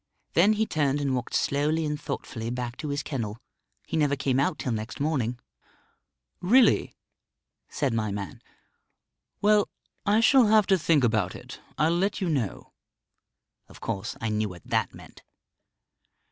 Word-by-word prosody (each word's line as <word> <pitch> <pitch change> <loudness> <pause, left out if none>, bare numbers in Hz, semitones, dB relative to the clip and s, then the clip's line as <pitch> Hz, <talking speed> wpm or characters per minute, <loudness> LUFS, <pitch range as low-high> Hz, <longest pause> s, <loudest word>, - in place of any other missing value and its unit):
Then 195 +6 +5
he 220 +1 +1
turned 145 -6 0
and 140 -2 0
walked 125 -2 -3
slowly 150 +3 +1
and 150 0 -3
thoughtfully 120 -5 -5
back 125 0 -4
to 155 - -5
his 145 0 -2
kennel. 115 -7 -4 0.5
He - - -4
never 145 -3 +2
came 130 -1 0
out 150 +3 +1
till 130 - -3
next 110 0 -4
morning." 135 -5 0 1.0
"Really?" 240 +8 +4 0.7
said 140 -6 -1
my 110 -2 0
man. 100 -5 -6 1.0
"Well, 210 0 +4 0.3
I 210 +2 +3
shall 245 +1 +6
have 215 -1 +5
to 190 -1 +3
think 155 -3 +3
about 110 -6 +1
it. - - -10 0.2
I'll 160 +2 +2
let 195 +4 0
you 185 -4 -1
know." 130 -10 -3 0.9
Of - - -15
course, 100 -4 -4
I 115 - -2
knew 105 0 0
what 90 -2 -11
that - - 0
meant. - - -14
140 Hz, 155 wpm, -27 LUFS, 115-170 Hz, 1.0 s, shall